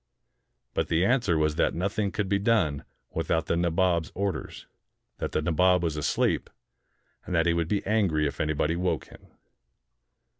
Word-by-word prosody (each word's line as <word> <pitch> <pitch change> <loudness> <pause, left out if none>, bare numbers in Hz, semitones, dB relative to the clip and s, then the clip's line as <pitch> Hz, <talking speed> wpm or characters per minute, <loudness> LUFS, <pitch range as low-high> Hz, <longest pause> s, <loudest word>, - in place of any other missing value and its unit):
But - - 0
the 85 +3 +2
answer 115 -8 +2
was 75 -1 +1
that - - +2
nothing 100 +4 -1
could 105 -3 -2
be 100 +1 +1
done 100 -10 +1 0.3
without 80 0 -1
the - - 0
Nabob's 85 -1 +1
orders, 100 0 -3 0.5
that - - -3
the 80 - -1
Na 85 - 0
bob 90 +2 +3
was 80 -3 -1
asleep, 75 - 0 0.7
and 90 - -4
that 80 0 +3
he 85 - +3
would 85 -1 0
be 100 +3 -1
angry 95 -8 +2
if 70 - -3
anybody 75 +1 0
woke 85 -3 -1
him. - - -16
85 Hz, 165 wpm, -27 LUFS, 80-100 Hz, 0.7 s, bob